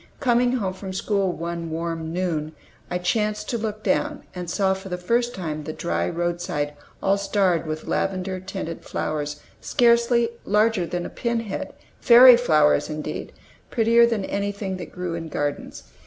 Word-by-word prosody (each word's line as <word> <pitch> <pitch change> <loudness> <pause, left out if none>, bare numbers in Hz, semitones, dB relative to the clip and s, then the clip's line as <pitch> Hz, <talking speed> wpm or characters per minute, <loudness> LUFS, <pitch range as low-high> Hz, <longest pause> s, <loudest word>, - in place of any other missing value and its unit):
Coming 245 -1 +3
home 200 -7 -1
from 190 0 -7
school 195 -1 0
one 170 0 -4
warm 165 0 -3
noon, 160 -3 -2 0.3
I 180 - -1
chanced 210 +3 -1
to 235 - -1
look 215 -1 -4
down, 295 -1 0
and 180 -2 -6
saw 190 +1 +2
for 190 0 -7
the 180 - -3
first 235 +7 0
time 155 -5 -4
the 155 - -5
dry 85 - -1
roadside 175 -3 -2 0.3
all 195 +1 +3
starred 190 -5 +1
with 155 0 -4
lavender 190 -1 -1
tinted 185 -3 -6
flowers, 150 -1 -3 0.2
scarcely 235 0 +3
larger 210 -3 +2
than 175 0 -3
a - - -5
pin 235 -1 -1
head; 210 -4 -5 0.3
fairy 245 +1 +9
flowers, 155 -11 +3
indeed; 155 0 -5 0.4
prettier 235 +1 +4
than 220 -4 -1
anything 200 -1 -3
that 175 - -8
grew 180 -2 -4
in 165 -1 -4
gardens. 145 -1 -3
185 Hz, 160 wpm, -24 LUFS, 165-220 Hz, 0.4 s, fairy